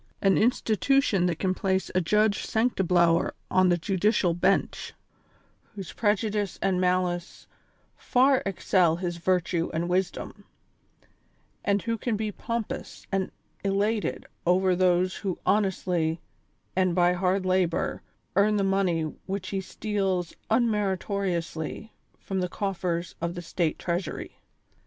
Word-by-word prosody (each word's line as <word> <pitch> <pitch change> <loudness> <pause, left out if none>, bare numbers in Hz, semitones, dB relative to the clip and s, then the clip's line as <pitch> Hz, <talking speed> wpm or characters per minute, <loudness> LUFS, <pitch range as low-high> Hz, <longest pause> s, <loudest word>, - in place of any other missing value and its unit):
An 195 -2 +3
institution 225 -3 +2
that 170 -3 -1
can 185 -1 0
place 190 0 -1
a 185 - +2
Judge 210 +3 +2
Sanctiblower 180 -7 +2 0.2
on 185 0 +4
the 175 - +3
judicial 190 0 +1
bencli, 185 +3 0 0.8
whose 195 -5 -7
prejudice 210 -2 0
and 185 -2 +1
malice 180 -1 -1 0.5
far 260 +1 +3
excel 185 -3 +2
his 175 0 -3
virtue 175 -1 0
and 170 +2 -1
wisdom; 180 0 -2 1.2
and 200 0 +1
who 230 -1 -2
can 235 0 -1
be 215 0 -2
pompous 230 +2 -5
and 195 -1 0 0.3
elated 205 +2 0 0.2
over 185 +1 +3
those 180 0 +2
who 190 -4 -3
honestly, 180 -5 +1 0.6
and 185 -2 +2
by 175 -1 +4
hard 185 +1 0
labor, 185 -2 +1 0.3
earn 205 +2 +4
the 200 - +1
money 190 -4 +1 0.2
which 190 -1 -3
he 195 -1 -2
steals 190 -3 -2 0.2
unmeritoriously 200 -5 -1 0.3
from 190 -1 -3
the 180 -1 -1
cof 195 0 -3
fers 170 -1 -2
of 170 +1 -2
the 175 - -5
state 165 -1 -1
treasury. 175 -1 -4
190 Hz, 125 wpm, -27 LUFS, 175-205 Hz, 1.2 s, on